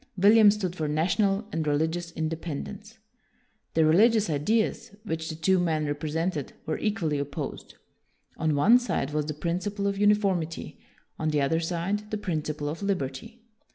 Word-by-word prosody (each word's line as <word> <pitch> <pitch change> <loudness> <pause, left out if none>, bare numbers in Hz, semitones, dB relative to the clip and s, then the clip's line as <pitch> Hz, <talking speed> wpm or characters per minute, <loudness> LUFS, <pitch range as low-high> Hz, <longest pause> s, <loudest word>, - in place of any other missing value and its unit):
William 210 +3 +7
stood 195 -4 -1
for 155 -4 -2
national 195 +7 +1
and 160 -1 -2
religious 160 +4 0
independence. 165 +7 -5 0.8
The 160 -1 +4
religious 210 +4 +4
ideas 205 +7 0
which 160 -6 -4
the 160 - -4
two 180 +4 +2
men 160 -3 0
represented 150 +1 -2
were 155 - -2
equally 170 -9 -1
opposed. 140 0 -5 0.6
On 160 -2 +1
one 220 +13 +6
side 195 - -2
was 150 -1 -1
the 155 - -3
principle 185 +6 -2
of 200 0 -1
uniformity, 200 -6 +1 0.4
on 155 - 0
the 150 -1 +1
other 160 +4 +1
side 180 +5 -2
the 215 - -2
principle 155 -6 -3
of 155 +5 -4
liberty. 200 - -3
165 Hz, 150 wpm, -27 LUFS, 155-205 Hz, 0.8 s, William